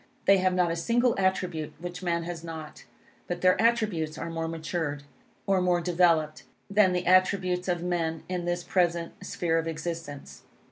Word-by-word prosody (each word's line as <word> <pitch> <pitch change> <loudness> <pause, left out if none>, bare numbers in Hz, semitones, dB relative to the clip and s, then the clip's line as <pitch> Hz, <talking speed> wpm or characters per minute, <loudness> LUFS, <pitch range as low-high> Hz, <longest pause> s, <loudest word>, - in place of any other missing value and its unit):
They 195 - +6
have 185 0 +2
not 180 -2 +2
a - - -1
single 235 +7 +2
attribute 180 -5 -1
which 175 +2 -7
man 170 -2 0
has 170 -1 -6
not. 160 -2 -8 0.4
But 175 0 -4
their 185 +1 +4
attributes 210 -10 +1
are 165 +1 -5
more 165 0 -3
matured, 160 -3 -3 0.4
or 195 -2 +2
more 180 -1 +2
developed, 170 -3 +2 0.3
than 200 -2 +5
the 180 0 -1
attributes 185 0 +3
of 175 -1 -1
men 165 -2 -1
in 180 -1 -3
this 175 0 -1
present 170 -2 0
sphere 165 -2 0
of 165 - -3
existence. 165 -3 -6
175 Hz, 170 wpm, -27 LUFS, 165-185 Hz, 0.4 s, They